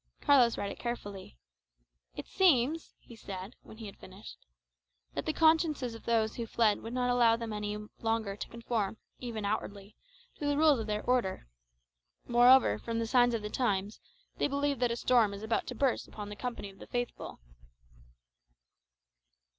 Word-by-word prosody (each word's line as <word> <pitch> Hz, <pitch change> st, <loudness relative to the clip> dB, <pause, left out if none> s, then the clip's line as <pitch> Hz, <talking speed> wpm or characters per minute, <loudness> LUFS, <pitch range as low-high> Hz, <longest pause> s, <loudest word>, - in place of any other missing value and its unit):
Carlos 255 Hz, -5 st, +4 dB
read 200 Hz, -, -3 dB
it -, -, -10 dB
carefully. 205 Hz, -, -6 dB, 0.8 s
"It -, -, -6 dB
seems," 320 Hz, -4 st, +2 dB
he 235 Hz, -, -15 dB
said, 195 Hz, 0 st, -8 dB
when 220 Hz, -, -14 dB
he 225 Hz, -, -8 dB
had 200 Hz, -, -10 dB
finished, -, -, -13 dB, 0.7 s
"that -, -, -4 dB
the -, -, +2 dB
consciences 315 Hz, -6 st, +2 dB
of 225 Hz, -, -11 dB
those 225 Hz, -2 st, +1 dB
who 235 Hz, -1 st, -4 dB
fled 220 Hz, -2 st, +2 dB
would 230 Hz, +2 st, -6 dB
not 250 Hz, -1 st, +1 dB
allow 235 Hz, -2 st, +4 dB
them 230 Hz, -1 st, -5 dB
any 210 Hz, 0 st, -3 dB, 0.2 s
longer 225 Hz, -3 st, -1 dB
to -, -, -7 dB
conform, 230 Hz, -3 st, -2 dB, 0.2 s
even 225 Hz, -4 st, -5 dB
outwardly, 200 Hz, 0 st, -4 dB, 0.4 s
to 290 Hz, -, -2 dB
the 290 Hz, 0 st, +1 dB
rules 300 Hz, -4 st, +5 dB
of 220 Hz, -, -4 dB
their 210 Hz, 0 st, -2 dB
order. 245 Hz, -, 0 dB, 0.8 s
Moreover, 245 Hz, -, +5 dB
from 230 Hz, 0 st, -4 dB
the 230 Hz, -, 0 dB
signs 245 Hz, 0 st, +3 dB
of 220 Hz, -, -4 dB
the 210 Hz, -, -5 dB
times, 205 Hz, -4 st, -1 dB, 0.4 s
they -, -, +2 dB
believe 280 Hz, -1 st, -1 dB
that 245 Hz, -1 st, +2 dB
a 235 Hz, -, -1 dB
storm 235 Hz, -4 st, +3 dB
is 200 Hz, -, -9 dB
about 220 Hz, +1 st, -1 dB
to 250 Hz, -, -5 dB
burst 265 Hz, +1 st, 0 dB
upon 210 Hz, -1 st, -8 dB
the 205 Hz, -, -7 dB
company 235 Hz, -3 st, -5 dB
of 195 Hz, -, -20 dB
the -, -, -11 dB
faithful." 245 Hz, 0 st, -4 dB
230 Hz, 175 wpm, -31 LUFS, 210-250 Hz, 0.8 s, rules